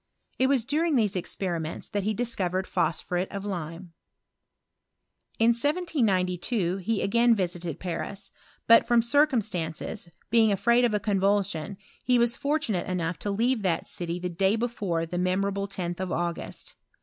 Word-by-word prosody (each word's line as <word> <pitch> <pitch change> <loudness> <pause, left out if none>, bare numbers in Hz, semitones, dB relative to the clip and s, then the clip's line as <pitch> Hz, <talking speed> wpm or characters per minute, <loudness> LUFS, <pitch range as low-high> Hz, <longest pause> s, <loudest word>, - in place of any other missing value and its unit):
It 260 - +4
was 265 -4 +2
during 310 +3 +1
these 215 -6 +2
exp 180 -1 -2
ments 155 +1 -6
that 205 - -1
he 215 +2 -1
discovered 190 -6 -1
phosphuretof 180 +5 -1
lime. 170 -2 -5 1.5
i - - +3
In 230 - +6
1792 225 - +1
he 200 +3 -1
again 235 +4 +4
visited 175 -4 -3
Paris; 195 +2 -4 0.3
but, 230 0 +6
from 240 -1 +4
circ* 285 +1 +4
stances, 175 0 -4 0.2
being 225 -2 +5
afraid 235 +5 +3
of 220 -3 +1
a - - +1
couvulsion, 195 -3 0 0.3
he 250 -1 +3
was 235 0 +3
I - - -15
tunate 285 - 0
enough 170 -3 -2
to 205 - -3
leave 230 +4 +1
that 175 -4 0
city 170 0 -3
the 180 0 -3
day 190 +4 +2
before'. 205 -8 -1
memorable 195 +2 0
10th 175 -3 -4
of 185 -1 -3
August. 170 0 -4
195 Hz, 150 wpm, -27 LUFS, 180-235 Hz, 1.5 s, In